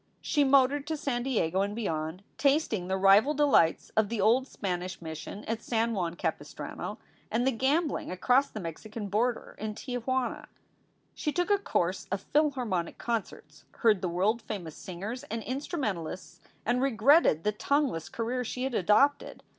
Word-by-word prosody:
She 290 - +1
motored 275 +1 +4
to 315 0 -2
San 265 -4 -1
Diego 195 -8 0
and 200 +1 -1
beyond, 165 -4 -3 0.2
tasting 275 - +2
the 190 0 0
rival 200 +10 +5
delights 275 - +3
of 215 -2 +3
the 230 -1 -2
old 250 +6 +3
Spanish 185 -4 -4
Mission 160 +5 -7
at 225 0 -3
San 230 0 0
Juan 175 -4 -2
Capistrano, - - -4 0.3
and 235 +3 0
the 265 - +3
gambling 285 +7 0
across 250 +9 +2
the 215 - -7
Mexican 205 +5 -6
border 230 +4 -1
in 215 -1 -4
Tia 245 +2 -4
Juana. 260 +1 -2 0.7
She 300 - -2
took 355 +5 0
a 405 - +4
course 185 - -1
of 195 0 -1
Philharmonic 255 - +1
concerts, 190 -10 -4
heard 215 -5 +3
the 180 - -1
world 200 +7 +1
famous 180 -8 -6
singers 200 +8 -6
and 225 -5 -4
instrumentalists, 215 - -4 0.3
and 245 +2 +1
regretted 265 - +4
the 210 - +2
tongueless 260 - 0
career 245 +2 -2
she 250 +2 -4
had 265 -1 -2
adopted. 225 +9 +2
225 Hz, 160 wpm, -29 LUFS, 190-265 Hz, 0.7 s, rival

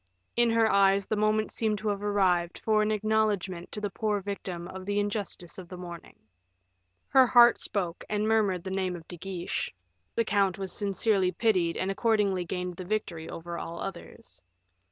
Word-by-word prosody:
In 240 0 +4
her 225 -1 +4
eyes 195 -1 +4
the 215 - -1
moment 215 +1 +1
seemed 215 -2 0
to 215 +1 -2
have 200 -1 -2
arrived 185 -4 +1
for 215 -1 +2
an 215 - +1
acknowledgement 210 -4 0
to - - -3
the 205 -1 -3
poor 210 0 0
victim 185 -3 -5
of 185 +1 -8
the 205 0 +1
injustice 205 -4 -3
of 180 -2 -10
the 180 - -8
morning. 175 -1 -9 0.9
Her 260 -1 +6
heart 240 -1 +7
spoke, 180 -4 -3
and 210 0 0
murmured 205 -5 +2
the 190 - -5
name 190 -1 -1
of 165 -2 -11
De 175 - -7
Guiche; 180 0 -3 0.4
the 230 - +1
count 200 -3 +2
was 195 -1 -4
sincerely 200 -2 +1
pitied 180 -4 +1
and 190 +1 0
accordingly 205 -3 +1
gained 180 0 -4
the 185 - -5
victory 180 -5 -3
over 170 +1 -6
all 170 +1 -6
others. 210 +3 -8
195 Hz, 180 wpm, -28 LUFS, 180-215 Hz, 0.9 s, heart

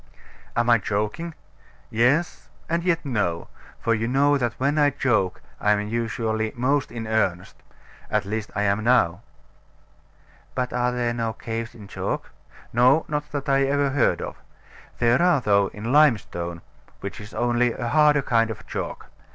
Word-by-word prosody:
Am 120 0 +1
I 120 -1 +5
joking? 105 - -3 0.6
Yes, 130 +9 +1 0.2
and 170 +1 -1
yet 170 -3 +1
no; 105 -10 -1 0.3
for 115 - +1
you 115 +1 -1
know 140 +3 +3
that 120 -4 0
when 140 +3 +1
I 145 -1 +5
joke 120 -9 0 0.2
I 105 - +3
am 105 0 -1
usually 110 -1 -1
most 135 +3 0
in 115 -1 -5
earnest. 95 -5 -1 0.5
At 105 -2 0
least, 105 +1 -3
I 105 - 0
am 100 +1 +1
now. 110 -7 +3 1.3
But 125 -1 -1
there 125 -1 0
are - - -3
no 115 -1 -2
caves 115 +1 -5
in 105 -3 -11
chalk? - - -4 0.4
No, 125 +6 +4
not 150 0 -3
that 145 -2 -4
I 135 0 +3
ever 140 0 +1
heard 140 -2 +2
of. - - -6 0.6
There 120 +4 +3
are, 175 -4 +4
though, 100 -4 +3
in 110 +5 -5
limestone, 105 - +2 0.4
which 100 +2 -6
is 105 +1 -11
only 120 0 +2
a 120 0 -4
harder 150 +1 +4
kind 115 -2 +2
of 110 - -7
chalk. - - -5
120 Hz, 160 wpm, -24 LUFS, 110-140 Hz, 1.3 s, I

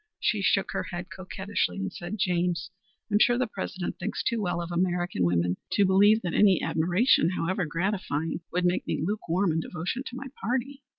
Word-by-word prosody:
She 215 -3 +1
shook 195 0 +2
her - - -2
head 175 0 -6
coquettishly 190 - -2
and 95 -1 -3
said: 175 +5 -5
"James, 175 -3 0 0.4
I'm 205 - +4
sure 240 +2 +5
the 255 - +1
President - - -5
thinks - - -3
too 235 -2 0
well 175 -3 -1
of 170 0 -5
American 175 - 0
women 85 +1 +1 0.2
to 200 - +4
believe 205 +4 +5
that 175 - -2
any 195 -4 +5
admiration, 175 +6 +3
however 185 +1 0
gratifying, 165 -2 -2
would 180 +1 0
make 180 0 +1
me - - -1
lukewarm 195 -2 0
in 160 - 0
devotion 175 +9 -3
to 245 - -7
my 270 +2 -6 0.2
party." 265 +3 -2
180 Hz, 185 wpm, -27 LUFS, 170-205 Hz, 0.4 s, sure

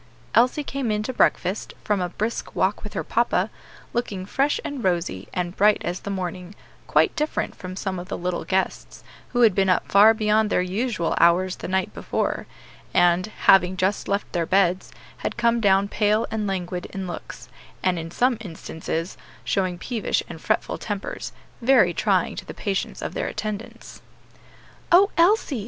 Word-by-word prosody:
Elsie 250 +5 +3
came 275 -3 -3
in 210 0 0
to 260 - -4
breakfast, 190 -3 +1
from 205 -3 0
a 180 - -1
brisk 215 +6 -4
walk - - 0
with - - -7
her - - -2
papa, - - +1 0.4
looking 205 -6 -2
fresh 275 +8 +1
and 280 -4 -4
rosy, 170 - -1
and 175 0 -3
bright 210 +1 +5
as 175 +1 -2
the - - -7
morning; 185 0 -5 0.3
quite - - +3
different 300 +1 -1
from 185 0 -8
some 190 -1 -3
of 180 - -8
the - - -4
little 180 0 -2
guests, 190 0 -2 0.3
who 245 - 0
had 225 -4 +6
been 195 0 +2
up 185 - +1
far 210 +3 +7
beyond 215 0 +2
their - - +2
usual 195 -1 -1
hours 180 +2 +4
the - - -6
night 190 +1 -1
before, - - -2 0.5
and, 175 +2 +4 0.2
having 185 -1 +6
just 190 +2 0
left 200 +1 -1
their 170 -2 0
beds, 185 -1 +2 0.3
had - - -4
come 235 0 +2
down 195 -1 +4
pale 210 +1 +1
and 215 -2 -1
languid 180 -2 -3
in 195 -1 -6
looks, 175 - -8 0.4
and 180 -2 +1
in 165 0 -6
some 245 +6 +1
instances 165 -2 -5 0.3
showing 185 -3 0
peevish 230 +4 -1
and - - -9
fretful - - -1
tempers, 205 -2 -5 0.3
very 265 +3 +5
trying - - +1
to - - -6
the - - -9
patience 195 -3 -3
of - - -4
their - - -2
attendants. 215 0 -6 0.9
"O 390 +4 +6
Elsie!" 335 - +3
195 Hz, 175 wpm, -24 LUFS, 180-225 Hz, 0.9 s, far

